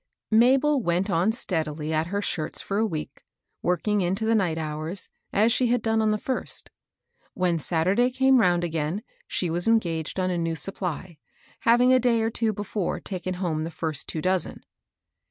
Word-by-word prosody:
Mabel 265 +5 +4
went 185 +1 0
on 180 +4 +3
steadily 160 - -3
at 155 +1 +1
her 200 +3 -2
shirts 155 -5 -2
for 200 +1 -2
a 225 - +2
week, 155 -7 -6 0.4
working 200 +4 +1
into 190 +5 0
the 225 - +3
night 180 -7 +1
hours, 155 +4 -4 0.2
as 220 +3 +3
she 250 0 +2
had 240 -1 +1
done 225 0 +2
on 215 - +2
the 215 - +2
first. 260 +4 -4 0.6
When 175 -2 +1
Saturday 185 +10 +2
came 265 0 +4
round 175 -5 +3
again 165 +4 -2 0.2
she 175 -3 -1
was 175 +4 0
engaged 170 -7 +1
on 185 0 +1
a 175 - -1
new 165 -1 -1
supply, 180 -1 -3 0.4
having 245 +2 +5
a 255 - +6
day 235 -2 +2
or 225 - 0
two 225 -1 0
before 205 -2 -3
taken 185 -1 -4
home 170 -4 -2
the 165 - -3
first 160 -3 -4
two 155 - -4
dozen. 185 0 -1
185 Hz, 180 wpm, -25 LUFS, 165-225 Hz, 0.6 s, a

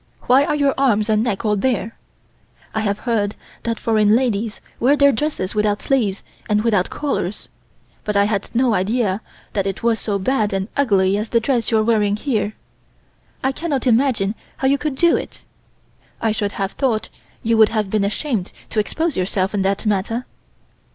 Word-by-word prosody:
Why 265 +3 +4
are 295 - 0
your 280 -2 +2
arms 220 -6 +2
and 215 0 +3
neck 230 -2 -2
all 210 -1 +2
bare? 230 0 -1 0.8
I 220 - 0
have 205 -2 0
heard 215 -4 -1 0.3
that 230 -1 -2
foreign 215 -1 +3
ladies 230 -3 0 0.2
wear 265 +5 +4
their 280 -1 +5
dresses 255 -7 -2
without 210 -1 +1
sleeves 220 -8 0 0.3
and 210 0 +2
without 205 -6 +2
collars, 215 -10 -3 0.5
but 210 - -2
I 200 - +5
had 205 -2 -1
no 245 -1 +3
idea 210 0 0 0.3
that 195 -1 0
it 195 +2 -4
was 230 -1 +2
so 205 -2 -1
bad 210 0 0
and 195 +2 -2
ugly 200 -8 +3
as 215 - -4
the 230 - +3
dress 235 -1 0
you 225 - +3
are 215 - +3
wearing 210 -2 +2
here. 215 -3 -1 0.9
I 265 - +2
cannot 285 -2 -2
imagine 230 -5 +2 0.2
how 265 - +1
you 280 +1 +3
could 300 -3 -2
do 340 +4 +4
it. - - -8 0.7
I 225 - +1
should 205 -1 -2
have 195 -1 -2
thought 240 -6 -1 0.3
you 230 0 +2
would 220 -1 +6
have 215 -3 -1
been 215 -2 +2
ashamed 210 -1 -2 0.2
to 220 - 0
expose 320 +9 -1
yourself 185 +1 -1
in 205 - 0
that 195 +3 0
manner. 215 +4 0
220 Hz, 185 wpm, -20 LUFS, 205-255 Hz, 0.9 s, would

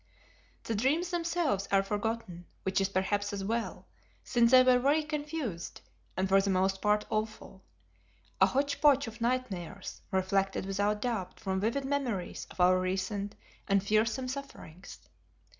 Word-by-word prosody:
The 225 - -2
dreams 290 - +1
themselves 335 - 0
are 195 0 +4
forgotten, 205 -4 -3 0.2
which 190 +1 +1
is 195 - +1
perhaps 205 +2 -1
as 195 -1 -3
well, 230 +3 -3 0.4
since 235 -2 +3
they 255 0 +8
were 255 -1 +5
very 290 +5 +3
confused, 295 - -4 0.4
and 190 +1 +1
for 195 +1 +5
the 200 - -1
most 190 0 +1
part 210 0 +2
awful; 215 -3 -4 0.8
a - - +8
hotch 280 +2 -1
potch 285 -2 +5
of 225 0 -9
nightmares, 205 -7 -3
reflected 190 0 0
without 205 +2 0
doubt 215 -7 -3
from 190 -3 -2
vivid 235 +7 -1
memories 255 -10 -2
of - - -15
our 180 +1 +5
recent 195 +2 -2 0.3
and 195 -1 +3
fearsome 220 +5 +1
sufferings. 255 - -8
210 Hz, 145 wpm, -30 LUFS, 195-255 Hz, 0.8 s, they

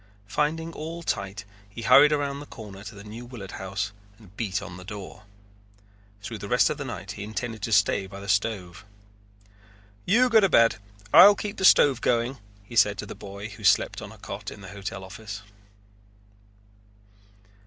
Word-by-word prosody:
Finding 160 +9 -1
all 165 +2 -6
tight 100 -6 -3 0.2
he 115 +4 -8
hurried 145 +7 +7
around 140 -1 -1
the 145 - -10
corner 100 -3 -10
to 105 +1 -9
the 100 - -11
New 110 +3 -9
Willard 120 -6 -9
House 95 +1 -4 0.3
and 100 -4 -18
beat 105 -3 -2
on 90 - -9
the 90 - -10
door. 100 +1 -9 1.0
Through - - -6
the - - -6
rest - - +3
of - - -4
the - - -4
night - - -6
he - - -7
intended 110 +1 -5
to 115 - -3
stay 100 -1 +3
by 100 +1 -10
the 100 - -9
stove. 100 -2 -1 1.2
"You 240 +7 +5
go 225 -2 +6
to 195 -2 +3
bed. 115 -7 +5 0.4
I'll 190 +6 +10
keep 205 0 -5
the 190 - 0
stove 135 -8 +6
going," 120 +2 0 0.2
he 120 +4 -11
said 105 -3 +4
to 105 - -5
the - - -8
boy 100 +1 -8
who 105 - -12
slept - - +3
on - - -8
a - - -14
cot - - -7
in 105 - -11
the 95 - -10
hotel 100 -1 -6
office. 100 +1 -8
105 Hz, 185 wpm, -26 LUFS, 100-140 Hz, 1.2 s, I'll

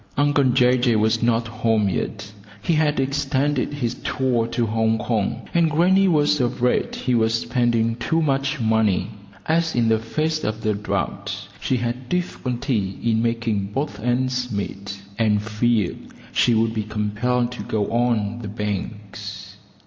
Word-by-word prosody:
Uncle 145 0 +3
Jay 125 0 +4
Jay 120 -2 +3
was 110 +1 +2
not 115 -1 +2
home 110 -2 +1
yet: 105 +3 -3 0.3
he 170 - +1
had 150 -2 +2
extended 140 +1 0
his 125 -5 -2
tour 125 -4 0
to 120 0 0
Hong 110 0 +1
Kong, 110 -1 -2
and 170 -1 +3
grannie 185 +5 +4
was 150 -4 +3
afraid 125 0 0
he 125 - -1
was 115 -1 +3
spending 115 -1 +1
too 120 +8 0
much 140 -2 0
money, 110 -3 +1 0.3
as 165 +1 +1
in 115 -2 +3
the 110 0 +3
face 155 +7 -1
of 110 +1 -2
the 110 -1 +1
drought 105 +1 -3
she 130 - 0
had 120 +1 -3
difficulty 125 - -2
in 115 -1 +2
making 115 -3 0
both 120 +1 -3
ends 125 +1 0
meet, 100 -1 -4 0.2
and 105 -2 +2
feared 110 -2 0 0.3
she 120 - +3
would 110 0 +2
be 110 - -1
compelled 110 +4 -1
to 125 - -6
go 105 -2 -1
on 115 -2 +1
the 110 - -6
banks. 105 0 -5
120 Hz, 155 wpm, -22 LUFS, 110-130 Hz, 0.3 s, Jay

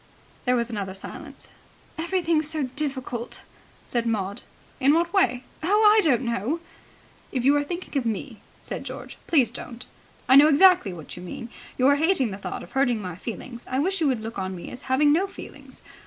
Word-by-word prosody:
There 250 0 +3
was 235 0 -1
another 195 -3 -4
silence. 195 - -9 0.5
"Everything's 330 -2 0
so 310 -2 -1
difficult," 260 -3 -4 0.4
said 235 -1 -1
Maud. 205 -3 -2 0.4
"In 280 +2 +5
what 340 +2 +1
way?" 250 -11 +2 0.2
"Oh, 410 +7 +3
I 435 - +6
don't 265 -5 +3
know." 235 - -1 0.7
"If 255 -2 -1
you 280 +2 +6
are 290 - +2
thinking 345 +2 -6
of 270 -3 +1
me," 225 +1 -4 0.2
said - - -5
George, - - -8
"please 265 -9 +4
don't. 240 0 -8 0.4
I 265 - +8
know 290 +2 +9
exactly 335 - +6
what 165 -4 -9
you 180 - -9
mean. 180 +6 -7 0.3
You 255 - +2
are 285 +1 +5
hating 300 - +2
the 190 - -6
thought - - -5
of - - -13
hurting 265 -4 +2
my 180 -4 -5
feelings. 235 +4 -7
I 255 - -1
wish 370 +6 0
you 310 - +3
would 255 -5 0
look 225 -2 -5
on 190 0 -3
me 175 - -8
as 250 - -8
having 290 +3 +4
no 370 +5 +2
feelings. 390 - -12
260 Hz, 195 wpm, -25 LUFS, 230-310 Hz, 0.7 s, know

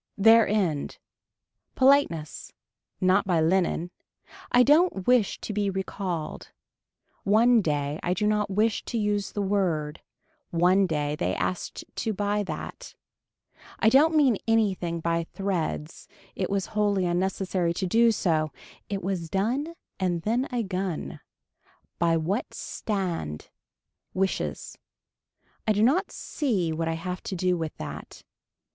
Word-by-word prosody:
Their 225 +2 +6
end. 180 -9 -1 0.8
Politeness. 260 - +2 0.5
Not 190 +2 +3
by 175 -3 +2
linen. 175 +1 +1 0.6
I 245 - +6
don't 295 - +3
wish 245 -5 +3
to 215 - -4
be 205 -1 0
recalled. 185 -4 -4 0.7
One, 230 +3 +5
day, 145 -3 -1
I 180 +1 0
do 210 - 0
not 210 -1 +1
wish 210 +2 +1
to 235 - -3
use 205 -2 0
the 205 - -1
word, 170 -6 -1 0.5
one 180 +3 +3
day 150 -3 -1
they 170 - -1
asked 185 - -3
to 220 -1 -1
buy 205 +1 0
that. 185 - -7 0.8
I 220 - +4
don't 305 +6 +5
mean 270 -8 +4
anything 190 -7 +1
by 170 0 0
threads. 165 - -3 0.3
It - - -2
was 195 -1 0
wholly 205 -3 +1
unnecessary 180 -1 0
to 190 - -1
do 230 +5 +4
so. 160 -7 0 0.4
It 195 -2 -3
was 180 -3 -3
done 255 - -1 0.2
and 175 -3 -1
then 235 +5 +1
a 245 -2 -1
gun. 185 -4 -4 0.8
By 170 -1 +3
that 185 +9 -2
stand. 175 - -4 0.6
Wishes. 190 0 -2 0.9
I 215 - +4
do 210 +1 +2
not 330 - +3
see 200 - -1
what 165 +1 -2
I 165 - 0
have 180 +3 -5
to 190 - -5
do 180 0 +1
with 160 -2 -4
that. - - -8
190 Hz, 135 wpm, -26 LUFS, 170-215 Hz, 0.9 s, Their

